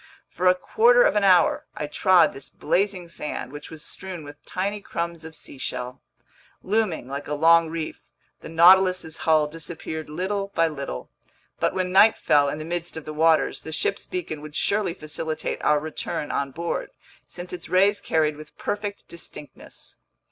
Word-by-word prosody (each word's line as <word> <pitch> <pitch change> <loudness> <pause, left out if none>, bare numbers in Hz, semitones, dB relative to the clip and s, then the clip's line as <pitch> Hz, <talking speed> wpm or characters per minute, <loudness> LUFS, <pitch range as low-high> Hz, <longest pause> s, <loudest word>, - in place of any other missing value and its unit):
For 185 - 0
a 180 - +6
quarter 470 - +4
of - - +3
an 210 - +2
hour, 180 -3 +4
I 150 - -3
trod 175 +3 +4
this 135 - -7
blazing 190 -2 -1
sand, 150 -5 -6
which 145 +1 -9
was 160 -2 -8
strewn 185 -4 -6
with 145 0 -12
tiny 200 +3 -2
crumbs 170 -3 -4
of 160 0 -10
seashell. 125 -3 -5 0.6
Looming 200 - 0
like 140 +2 -5
a 150 - -2
long 165 +2 +5
reef, 160 -1 -5 0.4
the - - -10
Nautilus's 180 0 +5
hull 155 -1 +5
disappeared 160 0 -6
little 195 +5 -2
by 165 0 +4
little, 140 - -6 0.5
but - - 0
when 185 -1 -1
night 210 +4 +6
fell 145 -1 +3
in 150 - -3
the 155 - -6
midst 170 0 -4
of 160 - -7
the 155 - -6
waters, 155 -2 +2
the 160 - -8
ship's 195 +5 -1
beacon 160 -4 -4
would 150 0 -10
surely 200 -3 0
facilitate 155 -1 -4
our 150 - +3
return 155 +1 -4
on 140 - -1
board, 170 +5 -3 0.4
since 180 0 -8
its 180 - -7
rays 200 +3 +4
carried 155 -2 0
with 155 0 -13
perfect 205 0 -4
distinctness. 155 -3 -10
165 Hz, 170 wpm, -24 LUFS, 150-185 Hz, 0.6 s, a